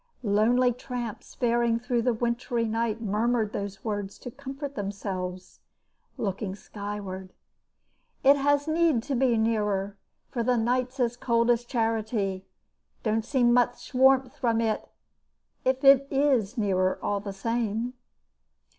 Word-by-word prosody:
Lonely 235 Hz, +4 st, +3 dB
tramps 240 Hz, -3 st, -6 dB
faring 235 Hz, -1 st, +2 dB
through 240 Hz, 0 st, -1 dB
the 250 Hz, +2 st, +2 dB
wintry 235 Hz, 0 st, -1 dB
night 225 Hz, 0 st, -1 dB
murmured 220 Hz, +1 st, 0 dB
those 200 Hz, 0 st, -5 dB
words 205 Hz, -2 st, -3 dB
to 245 Hz, -, -8 dB
comfort 275 Hz, +2 st, -7 dB
themselves 190 Hz, -4 st, -5 dB, 0.6 s
looking 195 Hz, -1 st, -3 dB
skyward. 200 Hz, -3 st, -7 dB, 0.9 s
"It 275 Hz, +1 st, +7 dB
has 285 Hz, +1 st, +2 dB
need 315 Hz, -7 st, +2 dB
to 280 Hz, -, -3 dB
be 245 Hz, -2 st, +3 dB
nearer, 210 Hz, -3 st, 0 dB, 0.3 s
for 240 Hz, -, -2 dB
the 245 Hz, +1 st, +2 dB
night's 250 Hz, +3 st, 0 dB
as 240 Hz, -1 st, +1 dB
cold 235 Hz, -1 st, +2 dB
as 240 Hz, 0 st, +1 dB
charity. 220 Hz, -5 st, -1 dB, 0.6 s
Don't 220 Hz, 0 st, +1 dB
seem 240 Hz, -1 st, +3 dB
much 245 Hz, +2 st, +1 dB
warmth 265 Hz, 0 st, +4 dB
from 235 Hz, -5 st, +1 dB
it 220 Hz, -2 st, -1 dB, 0.7 s
if 260 Hz, +1 st, +1 dB
it 275 Hz, 0 st, +7 dB
is 270 Hz, -6 st, +1 dB
nearer, 185 Hz, -3 st, +1 dB
all 205 Hz, -1 st, 0 dB
the 200 Hz, 0 st, -6 dB
same." 230 Hz, +3 st, -2 dB
230 Hz, 130 wpm, -27 LUFS, 205-250 Hz, 0.9 s, It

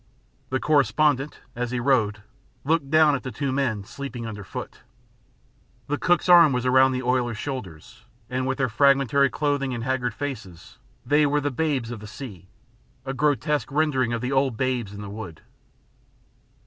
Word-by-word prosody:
The 130 Hz, -, 0 dB
correspondent, 145 Hz, 0 st, +2 dB
as 120 Hz, 0 st, -2 dB
he 125 Hz, 0 st, -2 dB
rowed, 110 Hz, -5 st, +1 dB, 0.4 s
looked 155 Hz, -1 st, 0 dB
down 155 Hz, 0 st, +5 dB
at 135 Hz, -, -1 dB
the 130 Hz, -, -5 dB
two 140 Hz, 0 st, -2 dB
men 130 Hz, -7 st, -1 dB
sleeping 120 Hz, +1 st, -7 dB
under 105 Hz, -2 st, -6 dB
foot. -, -, -8 dB, 1.1 s
The 145 Hz, +1 st, -2 dB
cook's 175 Hz, 0 st, +2 dB
arm 170 Hz, -5 st, +7 dB
was 125 Hz, 0 st, -1 dB
around 130 Hz, +1 st, +5 dB
the 130 Hz, 0 st, -3 dB
oiler's 125 Hz, -2 st, 0 dB
shoulders, 105 Hz, -, -7 dB, 0.2 s
and, 130 Hz, +2 st, -2 dB
with 130 Hz, -, -1 dB
their 135 Hz, -, +1 dB
fragmentary 140 Hz, +2 st, +3 dB
clothing 145 Hz, -3 st, -1 dB
and 115 Hz, -, -5 dB
haggard 125 Hz, -3 st, -1 dB
faces, 120 Hz, -, -7 dB, 0.3 s
they 145 Hz, +3 st, +3 dB
were 145 Hz, +1 st, +1 dB
the 145 Hz, 0 st, -2 dB
babes 135 Hz, -4 st, -1 dB
of 120 Hz, -, -6 dB
the 105 Hz, -, -10 dB
sea, 105 Hz, -5 st, -10 dB, 0.6 s
a 135 Hz, -, -3 dB
grotesque 145 Hz, +1 st, 0 dB
rendering 140 Hz, -5 st, +1 dB
of 115 Hz, -1 st, -2 dB
the 125 Hz, +1 st, -2 dB
old 135 Hz, -4 st, +1 dB
babes 125 Hz, -5 st, -1 dB
in 100 Hz, 0 st, -8 dB
the 105 Hz, -, -7 dB
wood. 95 Hz, -7 st, -8 dB
130 Hz, 170 wpm, -24 LUFS, 115-145 Hz, 1.1 s, arm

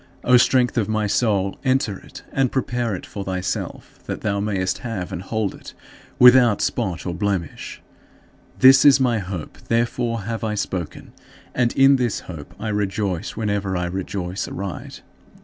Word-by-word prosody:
O 125 Hz, -, +5 dB
Strength 125 Hz, 0 st, +3 dB
of 110 Hz, -2 st, -1 dB
my 110 Hz, -1 st, 0 dB
soul, 100 Hz, -3 st, 0 dB
enter 130 Hz, -6 st, +1 dB
it -, -, -13 dB
and 135 Hz, -2 st, +1 dB
prepare 120 Hz, -4 st, -1 dB
it -, -, -8 dB
for 100 Hz, -, -6 dB
thyself 95 Hz, -1 st, -4 dB
that -, -, -4 dB
thou 100 Hz, -2 st, -1 dB
mayest 100 Hz, -2 st, -1 dB
have 105 Hz, -7 st, -5 dB
and 90 Hz, -2 st, -4 dB
hold 105 Hz, +1 st, -2 dB
it, -, -, -12 dB, 0.4 s
without 125 Hz, -3 st, +7 dB
"spot 85 Hz, -3 st, -2 dB
or 90 Hz, -, -2 dB
blemish." 95 Hz, -3 st, -3 dB, 0.7 s
This 130 Hz, 0 st, +7 dB
is 140 Hz, -1 st, +7 dB
my 120 Hz, -4 st, +2 dB
hope, 90 Hz, -4 st, -7 dB
therefore 115 Hz, 0 st, 0 dB
have 115 Hz, +3 st, -4 dB
I 110 Hz, -1 st, -1 dB
spoken; 90 Hz, -5 st, -5 dB, 0.4 s
and 120 Hz, -1 st, +1 dB
in 135 Hz, 0 st, +5 dB
this 120 Hz, -4 st, -1 dB
hope 80 Hz, -5 st, -10 dB
I 110 Hz, -, -3 dB
rejoice 100 Hz, -3 st, -2 dB
whenever 100 Hz, -3 st, -1 dB
I 90 Hz, -, -1 dB
rejoice 90 Hz, +1 st, -4 dB
aright. 95 Hz, 0 st, -7 dB
105 Hz, 160 wpm, -22 LUFS, 95-120 Hz, 0.7 s, without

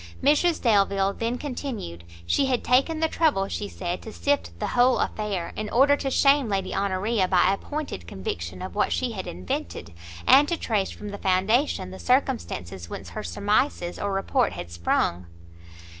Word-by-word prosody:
Mrs 300 Hz, +4 st, +3 dB
Delvile 200 Hz, -3 st, +2 dB
then 230 Hz, +3 st, -2 dB
continued; 245 Hz, -, -5 dB, 0.2 s
she 270 Hz, -, +2 dB
had 255 Hz, -2 st, 0 dB
taken 275 Hz, +6 st, +2 dB
the 320 Hz, -, +3 dB
trouble, 300 Hz, -13 st, +1 dB
she 205 Hz, -, -4 dB
said, 180 Hz, -2 st, -4 dB
to 220 Hz, -, -8 dB
sift 285 Hz, +5 st, 0 dB
the -, -, -2 dB
whole 250 Hz, +1 st, +4 dB
affair, 200 Hz, -5 st, -2 dB
in 210 Hz, -, -4 dB
order 275 Hz, +4 st, +5 dB
to 275 Hz, -, -3 dB
shame 275 Hz, -2 st, +4 dB
Lady 195 Hz, -1 st, -1 dB
Honoria 195 Hz, +1 st, 0 dB
by 180 Hz, +1 st, +4 dB
a -, -, -2 dB
pointed 290 Hz, -, -6 dB
conviction 90 Hz, 0 st, -5 dB
of 95 Hz, -1 st, -6 dB
what -, -, +1 dB
she 85 Hz, -, 0 dB
had -, -, -6 dB
invented, 85 Hz, -1 st, -5 dB, 0.3 s
and 290 Hz, -, +7 dB
to 340 Hz, -, -1 dB
trace 210 Hz, -9 st, 0 dB
from 210 Hz, -, -8 dB
the 200 Hz, 0 st, -7 dB
foundation 190 Hz, -, +1 dB
the 95 Hz, -, -9 dB
circumstances 85 Hz, 0 st, -1 dB
whence 95 Hz, -2 st, -7 dB
her 85 Hz, -, -6 dB
surmises 200 Hz, -, 0 dB
or 200 Hz, -, -2 dB
report 205 Hz, +5 st, +1 dB
had 85 Hz, -, -7 dB
sprung. 85 Hz, +1 st, 0 dB
200 Hz, 175 wpm, -25 LUFS, -, 0.3 s, and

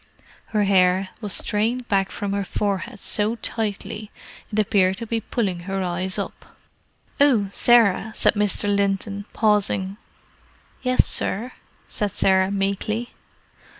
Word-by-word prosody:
Her 210 Hz, -2 st, +1 dB
hair 190 Hz, -1 st, +3 dB
was 210 Hz, -2 st, -2 dB
strained 230 Hz, +6 st, 0 dB
back 195 Hz, -3 st, +1 dB
from 200 Hz, -1 st, -4 dB
her 200 Hz, 0 st, -1 dB
forehead 200 Hz, 0 st, -3 dB
so 210 Hz, +4 st, 0 dB
tightly 215 Hz, -2 st, -4 dB, 0.4 s
it 210 Hz, -, -4 dB
appeared 190 Hz, -3 st, +2 dB
to 230 Hz, -, -5 dB
be 225 Hz, 0 st, -2 dB
pulling 200 Hz, -6 st, -2 dB
her 195 Hz, 0 st, -1 dB
eyes 185 Hz, +1 st, -1 dB
up. -, -, -7 dB, 0.6 s
"Oh, 245 Hz, -9 st, +4 dB
Sarah," 220 Hz, -2 st, +4 dB
said -, -, +3 dB
Mr. 205 Hz, -1 st, +1 dB
Linton, 200 Hz, 0 st, -1 dB
pausing. 205 Hz, -2 st, +1 dB, 0.8 s
"Yes, 255 Hz, 0 st, +3 dB
sir," 235 Hz, +6 st, 0 dB, 0.4 s
said 210 Hz, -, -2 dB
Sarah 190 Hz, 0 st, +2 dB
meekly. 200 Hz, +4 st, -2 dB
205 Hz, 125 wpm, -23 LUFS, 195-220 Hz, 0.8 s, Oh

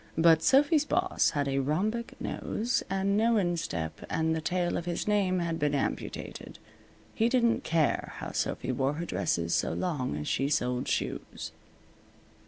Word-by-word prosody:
But 165 Hz, -1 st, +6 dB
Sophy's 290 Hz, -, +4 dB
boss -, -, +2 dB
had 145 Hz, -1 st, +1 dB
a 135 Hz, 0 st, 0 dB
rhombic 200 Hz, -, -1 dB
nose, 235 Hz, +3 st, -1 dB
and 195 Hz, +1 st, +1 dB
no 225 Hz, +2 st, +3 dB
instep, 165 Hz, -, -2 dB
and 160 Hz, 0 st, +1 dB
the 160 Hz, -, -2 dB
tail 175 Hz, +1 st, 0 dB
of 170 Hz, -, -3 dB
his 175 Hz, +2 st, -3 dB
name 200 Hz, -3 st, +2 dB
had 170 Hz, -2 st, -1 dB
been 145 Hz, 0 st, +1 dB
amputated. 140 Hz, -, -4 dB, 0.6 s
He 230 Hz, -1 st, +2 dB
didn't 235 Hz, -2 st, +2 dB
care 160 Hz, -3 st, +1 dB
how -, -, -6 dB
Sophy -, -, -2 dB
wore 135 Hz, +3 st, 0 dB
her 165 Hz, +3 st, -4 dB
dresses 85 Hz, -, -1 dB
so -, -, +1 dB
long 145 Hz, -, -2 dB
as 75 Hz, -, -5 dB
she 135 Hz, +2 st, 0 dB
sold 125 Hz, -4 st, 0 dB
shoes. -, -, -3 dB
170 Hz, 160 wpm, -29 LUFS, 140-210 Hz, 0.6 s, But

